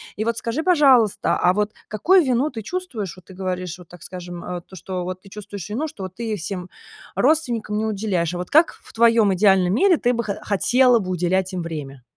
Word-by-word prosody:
И 215 - -2
вот 230 0 -1
скажи, 235 +8 -2
пожалуйста, 275 - +4
а 180 - +3
вот 210 +1 0 0.2
какую 345 - +4
вину 260 +2 +1
ты 225 - -6
чувствуешь? 245 - -4
Вот 185 - -17
ты 190 - -13
говоришь, 180 -2 -4
вот, 180 - -14
так 175 -1 -13
скажем, 175 -1 -8
а, 180 -1 -5
то, 190 - -15
что 185 +1 -5
вот 185 +1 -5
ты 195 - -16
чувствуешь 200 -2 -8
вину, 260 +10 -2
что 205 -10 -9
вот 185 -1 -7
ты 225 -1 -3
всем 185 0 -5 0.5
родственникам 240 -9 +1
не 215 - 0
уделяешь. 195 -5 -1
А - - -3
вот 180 0 -5
как 315 +3 +5
в - - -18
в - - -39
твоем 230 -3 +4
идеальном 190 -1 +4
мире 360 - +4
ты 245 -3 +1
бы 235 -1 -1
хо 205 - -2
хотела 245 +4 +3
бы 185 -3 -5
уделять 185 +1 0
им 180 - -2
время? 145 -6 -7
200 Hz, 225 wpm, -22 LUFS, 180-235 Hz, 0.5 s, как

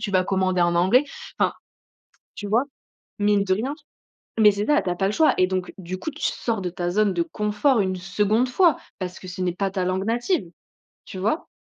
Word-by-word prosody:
tu 200 -4 -3
vas 185 - +4
commander 185 -1 0
en 175 0 +2
anglais, 190 +10 +4 0.4
enfin, - - +3 0.8
tu 205 - -6
vois, 225 +5 +3 0.5
mine 205 -1 +2
de 190 -1 +1
rien, 245 +9 -2 0.7
mais 210 -1 +7
c'est 205 +1 -2
ça, 300 0 +4
tu - - -3
as 175 - -1
pas 195 +2 0
le 200 - 0
choix 315 +8 +4
et 185 - +4
donc 185 -1 -3
du 185 -1 -6
coup, 315 - -4
tu 300 - -13
sors 225 -4 -2
de 180 - -2
ta 175 0 -3
zone 205 +2 +2
de 175 - 0
confort 210 - +1
une 185 -1 -1
2nde 210 +6 +1
fois 335 +6 +3 0.2
parce 185 -1 -5
que 185 - -10
ce 180 0 -6
n'est 180 -1 0
pas 195 +2 -1
ta 190 -1 -1
langue 185 +1 -1
native, 240 - 0 0.6
tu - - -9
vois 220 - -1
195 Hz, 220 wpm, -23 LUFS, 185-220 Hz, 0.8 s, mais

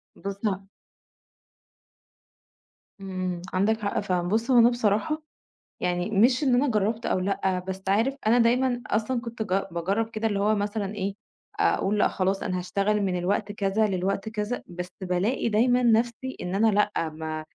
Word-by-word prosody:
بص 200 0 -5
ه 195 -1 -3 2.3
إمم، 185 -2 -3
عندك 205 +4 +2
حق 200 - -1
فعلًا. 180 -3 -1
بُص، 225 +7 0
هو 245 - +7
أنا 235 +1 +7
بصراحة 240 +6 0 0.6
يعني 180 +1 -1
مش 240 +7 +4
إن 260 -3 +3
أنا 260 +3 +3
جرّبت 220 +1 0
أو - - +1
لأ، 190 0 0
بس 190 0 -4
عارف 225 +7 +2
أنا 230 +3 +5
دايمًا 245 +1 +2
أصلًا 225 +4 0
كنت 235 -1 -5
ج 195 -1 0
باجرّب 195 +7 -1
كده 225 0 -2
اللي 205 -3 0
هو 210 +2 +3
مثلًا 205 0 -2
إيه، 200 -1 -3 0.5
أقول 205 +2 +2
لأ - - +4
خلاص 190 +1 -1
أنا 185 0 -1
هاشتغل 200 +4 0
من 185 -2 0
الوقت 200 +3 -1
كذا 205 +1 +1
للوقت 195 +2 -1
كذا، 215 +2 -3
بس 180 0 -6
بالاقي 190 +7 0
دايمًا 245 +3 +3
نفسي 240 +2 +1
إن 180 +1 -3
أنا 215 +3 +3
لأ 205 -5 +1
م 155 0 -5
205 Hz, 165 wpm, -26 LUFS, 190-230 Hz, 2.3 s, هو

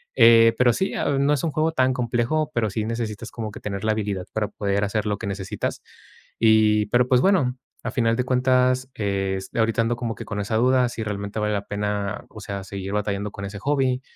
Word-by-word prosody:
eh, 115 0 +7
pero 125 -1 +5
sí, 190 - -1
am, 140 -1 +1
no 145 - +4
es 145 - -1
un 165 - +1
juego 155 +2 +1
tan 130 -4 +2
complejo, 125 +5 0
pero 115 -5 +1
sí 105 +2 -2
necesitas 115 -1 -4
como 110 -2 -5
que - - -9
tener 100 -1 -4
la 110 - +3
habilidad 100 -4 -3
para 110 -2 -1
poder 100 0 -1
hacer 105 +1 -1
lo 105 -1 0
que - - -6
necesitas, 95 -1 -4 0.6
y 110 -1 +4
pero 120 0 +3
pues, 125 -1 +4
bueno, 135 -10 +2 0.3
al - - -3
final 115 -2 +2
de 125 - 0
cuentas, 130 0 +2
es 95 -2 -2
ahorita 115 +1 +2
ando 115 +1 0
como 120 -1 -3
que - - -8
con 105 - -4
esa 105 +2 -1
duda, 125 +1 +3
si 120 - -6
realmente 100 0 -4
vale 105 0 0
la 100 -1 -2
pena, 105 -1 -2
o 110 - -11
sea, 100 -1 -5
seguir 95 0 -6
batallando 105 0 -2
con 100 - -7
ese 100 +1 -7
hobby, 135 -2 +1
110 Hz, 220 wpm, -23 LUFS, 100-125 Hz, 0.6 s, eh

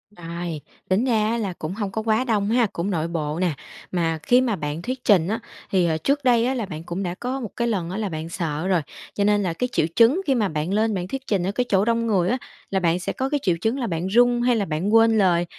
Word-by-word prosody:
Ai, 170 -2 -5 0.3
tính 195 +7 +2
ra 220 -4 +2
á 235 - 0
là 200 -5 -2
cũng 155 +4 -4
hông 205 -3 -3
có 220 +3 -2
quá 220 +2 +1
đông 210 -5 0
ha? 240 -2 +3
Cũng 175 +4 -2
nội 165 -3 -1
bộ 160 -1 -3
nè. 180 -4 +1 0.4
Mà 165 -3 0
khi 245 +1 +4
mà 240 -5 0
bạn 150 -1 -4
thuyết 255 +5 -4
trình 185 -6 +4
á 220 +4 -1 0.3
thì 180 -3 +2
hồi 160 - +1
trước 280 - 0
đây 240 -2 +4
á 260 - +1
là 235 -5 -2
bạn 160 -4 -7
cũng 175 +3 -4
đã 175 0 -3
có 250 +4 -3
một 230 -5 -5
cái 235 0 0
lần 185 -7 -1
á 190 - -4
là 215 -3 -2
bạn 160 0 -5
sợ 165 0 -3
rồi. 180 -4 +2 0.3
Cho 200 - 0
nên 205 0 +3
là 175 -3 -1
cái 250 +7 -2
triệu - - +2
chứng 250 +11 +5
khi 270 - +3
mà 215 -4 +2
bạn 155 +5 -2
lên 220 +1 +2
bạn 180 -1 -3
thuyết 270 +4 -6
trình 195 -4 +1
ở 195 - 0
cái 250 +4 -1
chỗ 195 0 +3
đông 230 0 +1
người 185 -4 +2
á, 255 - +1 0.3
là 190 - +1
bạn 175 0 +1
sẽ 180 - -3
có 265 +1 -2
cái 290 - 0
triệu 180 -3 +2
chứng 230 +7 0
là 240 - -1
bạn 170 +1 -2
run 240 +3 +4
hay 245 0 +3
là 205 -3 0
bạn 170 +7 -1
quên 225 -1 +5
lời? 175 -3 +3
200 Hz, 285 wpm, -23 LUFS, 175-235 Hz, 0.4 s, chứng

